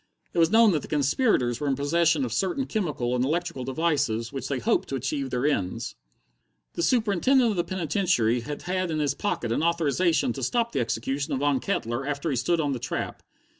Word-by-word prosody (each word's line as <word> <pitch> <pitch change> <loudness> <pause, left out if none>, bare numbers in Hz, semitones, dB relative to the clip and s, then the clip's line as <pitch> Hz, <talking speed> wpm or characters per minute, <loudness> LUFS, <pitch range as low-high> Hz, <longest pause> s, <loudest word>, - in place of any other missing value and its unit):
It - - 0
was 165 -1 +5
known 225 0 +6
that 155 -5 0
the - - -9
conspirators 140 - +1
were 145 - -2
in 135 - +2
possession 155 +1 +2
of 115 - -4
certain 195 - 0
chemical 150 - -1
and 125 - +1
electrical 165 -1 -2
devices 135 -5 0
with - - -4
which - - -4
they 140 - -1
hoped 120 - 0
to 135 - -2
achieve 135 +1 -2
their 125 +1 -1
ends. 100 -11 -1 0.8
The - - -3
Superintendent 230 +4 +3
of - - -2
the 175 - +1
penitentiary 165 - +1
had 145 +5 -6
had 185 0 -1
in 160 - -1
his 145 -3 +1
pocket 135 - -2
an 115 - +1
authorization 170 - +1
to - - -6
stop 235 -1 0
the 140 - -1
execution 135 +5 -2
of 135 - 0
Von 145 -2 +2
Kettler 120 - -2
after 145 +2 -2
he - - 0
stood 170 +7 +1
on 145 -2 0
the 130 - -2
trap. - - -4
150 Hz, 210 wpm, -26 LUFS, 130-175 Hz, 0.8 s, known